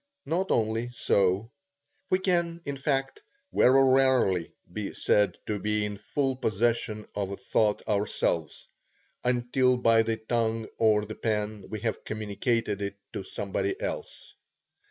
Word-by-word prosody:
Not 185 +4 0
only 115 +1 +1
so; 100 +2 +2 0.6
we 185 - +4
can, 170 -3 0
in 140 - -3
fact, 135 -1 -1 0.3
very 135 +2 +6
rarely 130 -9 +3 0.2
be 105 0 -4
said 105 -1 +2
to 105 -1 -2
be 105 0 0
in 105 -1 -4
full 130 +6 -1
possession 110 -2 0
of 100 -2 -2
a 100 - -5
thought 105 -2 0
ourselves, 100 -6 -1 0.6
until 125 +1 +2
by 115 -2 +5
the 115 0 -1
tongue 115 0 -1
or 105 -2 +4
the 110 - -6
pen 105 -2 -2
we 110 - -5
have 115 -2 -2
communicated 110 0 -1
it 100 0 -3 0.2
to - - -3
somebody 100 - -3
else. - - -5
110 Hz, 135 wpm, -28 LUFS, 105-130 Hz, 0.6 s, very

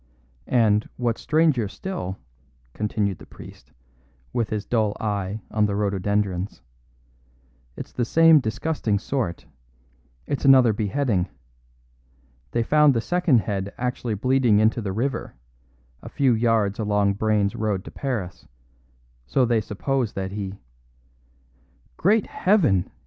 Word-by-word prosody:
"And, 110 -4 +2
what's 120 -2 -1
stranger 155 -8 +2
still," 100 - -5 0.6
continued 105 -3 -2
the - - -13
priest, - - -14 0.6
with 115 -3 -1
his 105 -1 -3
dull 110 -3 0
eye 105 0 -3
on 105 -1 +2
the 100 - -2
rhododendrons, 100 -2 -1 1.1
"it's - - -8
the 125 - -1
same 165 +5 +6
disgusting 120 -2 -1
sort; 110 -5 -3 0.8
it's 140 - -3
another 130 -4 +6
beheading. 105 -3 0 1.2
They 115 - 0
found 150 +1 +4
the - - +2
second 175 -6 +2
head 100 -2 -4
actually 125 -2 -2
bleeding 125 0 +2
into 110 +2 +2
the 100 -3 -3
river, 125 +7 -3 0.7
a - - -9
few 135 -3 +2
yards 110 -3 +1
along 105 -2 +1
Brayne's 105 -1 0
road 105 -4 -2
to - - -9
Paris; 110 -10 -4 0.8
so 130 - +2
they 115 -2 +2
suppose 120 +3 -2
that 95 -1 -4
he 100 -1 -5 0.7
" - - -37
"Great 210 +3 +4
Heaven!" 160 - +2
110 Hz, 125 wpm, -24 LUFS, 100-130 Hz, 1.2 s, same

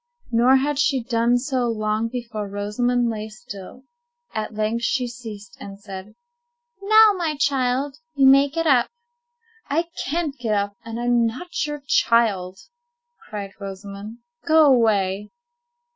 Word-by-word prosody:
Nor 245 +3 +5
had 280 +1 +1
she 275 -4 +2
done 235 0 +2
so 255 -1 -1
long 215 0 -1
before 230 -3 -5
Rosamond 235 +5 0
lay 215 -1 -4
still. 215 +1 -11 0.5
At 215 0 -4
length 215 +2 -1
she 250 0 0
ceased, 220 -5 -9
and 200 0 -9
said:— 195 0 -9 0.7
"Now, 435 +2 +7
my 330 -4 -1
child, 270 0 0 0.2
you 275 -1 +4
may 275 +1 +6
get 330 +3 -2
up." 260 -5 +4 0.8
"I 330 +4 0
can't 305 0 -2
get 225 -3 0
up, 200 0 -1
and 230 0 -6
I'm 240 -1 +2
not 300 +6 -4
your 295 -1 -6
child," 200 -8 +2 0.7
cried 205 -2 -5
Rosamond. 200 +2 -8 0.3
"Go 315 -1 +5
away." 210 -6 +2
235 Hz, 135 wpm, -22 LUFS, 210-270 Hz, 0.8 s, Now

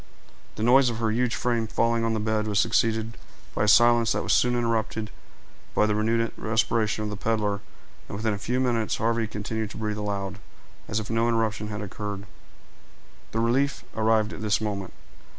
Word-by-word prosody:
The 110 - -3
noise 125 +2 +6
of 115 - -4
her 110 -1 0
huge 125 +2 +1
frame 120 -3 0
falling 115 +1 +1
on 115 -1 +1
the - - -1
bed 110 0 0
was 105 -2 +1
succeeded 115 0 +1 0.3
by 105 - +1
a - - -1
silence 120 +2 +5
that - - -1
was - - +1
soon 125 0 +3
interrupted 115 -2 -1 0.6
by 105 - +4
the 105 - +1
renewed 115 +2 +1
respiration 110 -1 0
of 105 - -3
the - - -4
peddler, 105 -1 0 0.5
and 100 - -6
within 110 0 0
a 100 - -4
few 125 +4 -1
minutes 120 -4 +1
Harvey 115 0 0
continued 110 0 -4
to - - -9
breathe 105 -1 -2
aloud, 100 -1 -3 0.5
as 110 - -1
if 110 +1 -5
no 115 +1 +2
interruption 110 -2 0
had 105 0 -5
occurred. 100 0 -5 1.1
The 115 - 0
relief 135 +5 +1
arrived 110 -1 +2
at - - -8
this 105 -1 +1
moment. 100 -4 -4
110 Hz, 185 wpm, -26 LUFS, 105-115 Hz, 1.1 s, noise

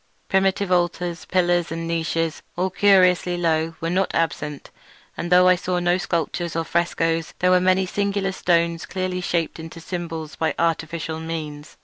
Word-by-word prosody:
Primitive 190 0 +1
altars, 175 -1 0
pillars, 175 -2 +1
and 165 0 -4
niches, 165 -1 -1 0.2
all 185 +1 0
curiously 185 -3 +4
low, 165 -1 0
were 165 - -1
not 190 +1 0
absent; 150 -3 -2 0.4
and 175 +1 -5
though 180 0 +6
I 185 - +6
saw 180 0 -2
no 175 +1 +1
sculptures 170 -1 -2
nor 165 - 0
frescoes, 165 -1 -1
there 180 0 +2
were 180 0 +5
many 185 +1 +3
singular 200 0 -1
stones 170 -2 0
clearly 185 -1 -3
shaped 170 -2 -1
into 165 +1 -9
symbols 165 -3 -5
by 160 -3 -1
artificial 165 -1 -1
means. 155 -2 -6
175 Hz, 155 wpm, -22 LUFS, 165-180 Hz, 0.4 s, though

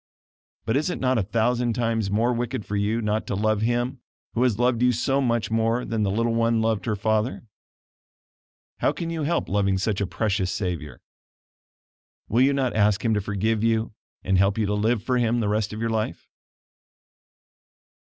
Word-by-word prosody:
But 110 - 0
is 155 +5 0
it - - -3
not 130 -2 +2
a - - +2
thousand 115 +4 0
times 115 -3 0
more 115 +5 +1
wicked 120 -1 -3
for 105 - -4
you 105 +3 0
not 105 +1 -1
to - - -2
love 110 +1 +1
Him 120 +3 0 0.3
who 120 - -1
has 125 -5 +2
loved 120 0 +1
you 125 0 +5
so 135 +4 0
much 115 -4 0
more 115 +2 +1
than 115 -1 -2
that 100 - +1
little 115 +4 0
one 115 0 +2
loved 110 -3 0
her 110 - +1
father? 110 +4 -1 1.4
How - - +2
can 165 -1 -4
you 165 -1 -3
help 165 +3 0
loving 100 -1 +1
such 100 +1 -1
a 100 - 0
precious 100 -3 -1
Savior? 90 -7 -4 1.2
Will 115 +4 +2
you 135 +2 +5
not 135 -3 0
ask 105 0 +2
Him 115 - +3
to 105 - +1
forgive 105 +2 -1
you 115 -1 +1 0.3
and 95 -1 +2
help 100 +2 +2
you 110 - +1
to 100 - -1
live 110 +2 +1
for 125 -1 +1
Him 120 0 +1
the 110 - 0
rest 105 0 0
of 105 - -6
your 115 0 -1
life? 110 -1 -3
110 Hz, 190 wpm, -24 LUFS, 105-120 Hz, 1.4 s, you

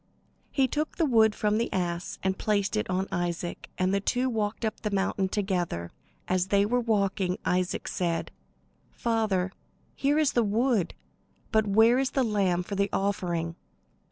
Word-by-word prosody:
He 270 -2 +2
took 300 +4 -2
the 330 - +3
wood 220 -5 +4
from 210 +1 +1
the 235 - -1
ass 175 -2 -2
and 190 0 +1
placed 205 -1 +1
it 215 - -1
on 185 +1 0
Isaac, 175 -1 -3
and 185 +1 +1
they 200 - +3
two 250 +5 0
walked 220 0 -1
up 220 - -2
the 210 - -2
mountain 195 -1 0
together. 180 - -2 0.4
As 185 0 +1
they 200 +1 +3
were 245 +4 +1
walking, 200 -5 0
Isaac 180 0 0
said: 170 -2 -1 0.6
"Father, 215 -6 0 0.4
here 285 +2 +1
is 310 -3 +3
the 240 - +3
wood, 225 -1 +1 0.6
but 220 -2 +3
where 225 +5 +5
is 265 -1 +1
the 265 - +1
lamb 195 -6 +1
for 200 - -7
the 200 0 +1
offering?" 175 -4 -1
200 Hz, 165 wpm, -28 LUFS, 185-225 Hz, 0.6 s, where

